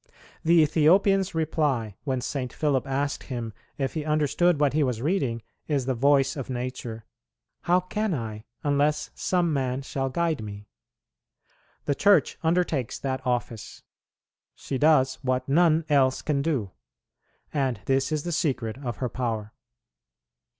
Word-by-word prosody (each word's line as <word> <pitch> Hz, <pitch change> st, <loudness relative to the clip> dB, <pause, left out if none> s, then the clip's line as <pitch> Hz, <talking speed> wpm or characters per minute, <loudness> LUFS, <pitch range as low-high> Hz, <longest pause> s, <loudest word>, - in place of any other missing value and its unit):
The 165 Hz, 0 st, +5 dB
Ethiopian's 185 Hz, +5 st, +3 dB
reply, 145 Hz, -9 st, 0 dB
when 130 Hz, -3 st, -1 dB
St. 125 Hz, -1 st, -3 dB
Philip 140 Hz, -5 st, 0 dB
asked 140 Hz, +1 st, -2 dB
him 120 Hz, -4 st, -5 dB, 0.2 s
if 135 Hz, -2 st, -2 dB
he 155 Hz, -, -3 dB
understood 155 Hz, +2 st, +2 dB
what 145 Hz, -2 st, +2 dB
he 155 Hz, -, +2 dB
was 125 Hz, -4 st, -1 dB
reading, 130 Hz, -, -1 dB, 0.2 s
is 140 Hz, -4 st, 0 dB
the 130 Hz, -, 0 dB
voice 140 Hz, +2 st, +3 dB
of 135 Hz, -3 st, -6 dB
nature: 120 Hz, -3 st, -5 dB, 0.6 s
"How 180 Hz, +1 st, +4 dB
can 205 Hz, +1 st, -2 dB
I, 110 Hz, -3 st, -6 dB, 0.2 s
unless 150 Hz, +1 st, +1 dB
some 175 Hz, -3 st, 0 dB
man 130 Hz, -1 st, -1 dB
shall 135 Hz, 0 st, -2 dB
guide 165 Hz, 0 st, 0 dB
me?" 105 Hz, -1 st, -8 dB, 1.2 s
The 145 Hz, -, +1 dB
Church 200 Hz, +7 st, +3 dB
undertakes 160 Hz, -7 st, 0 dB
that 130 Hz, -1 st, -3 dB
office; 120 Hz, -2 st, -3 dB, 0.7 s
she 135 Hz, -, -4 dB
does 135 Hz, -4 st, +4 dB
what 130 Hz, -1 st, -1 dB
none 160 Hz, +2 st, +3 dB
else 135 Hz, -3 st, +2 dB
can 145 Hz, -3 st, 0 dB
do, 135 Hz, -, -1 dB, 0.8 s
and 135 Hz, -5 st, 0 dB
this 135 Hz, +1 st, +1 dB
is 155 Hz, -2 st, -1 dB
the 175 Hz, -, -3 dB
secret 130 Hz, -8 st, -1 dB
of 120 Hz, -2 st, -4 dB
her 125 Hz, -, -1 dB
power. 115 Hz, -4 st, -3 dB
140 Hz, 145 wpm, -26 LUFS, 125-155 Hz, 1.2 s, The